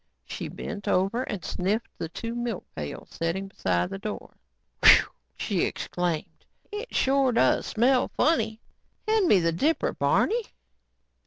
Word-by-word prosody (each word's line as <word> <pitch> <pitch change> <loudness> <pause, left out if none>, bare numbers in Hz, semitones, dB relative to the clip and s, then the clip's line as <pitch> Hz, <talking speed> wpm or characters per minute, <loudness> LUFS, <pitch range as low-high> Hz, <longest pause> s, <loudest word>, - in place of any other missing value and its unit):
She - - -5
bent 205 -3 -7
over 195 +7 +1
and 205 -8 -5
sniffed 205 +6 -1
at - - -41
the 165 - -3
two 230 +7 -5
milk 240 -4 -3
pails 75 -2 -6
setting 185 +4 -2
beside 90 - -1
the 95 - -5
door. - - -6 0.5
"Whew," - - +9 0.3
she - - -1
exclaimed, 175 -3 -2 0.3
"it 425 +4 -6
sure 270 -1 +3
does 235 - +2
smell 250 +3 +3
funny. 225 -8 +2 0.5
Hand 435 -4 +3
me 200 - +6
that 165 0 0
dipper, 315 - +1
Barney." 475 +2 +2
220 Hz, 145 wpm, -26 LUFS, 175-260 Hz, 0.5 s, Whew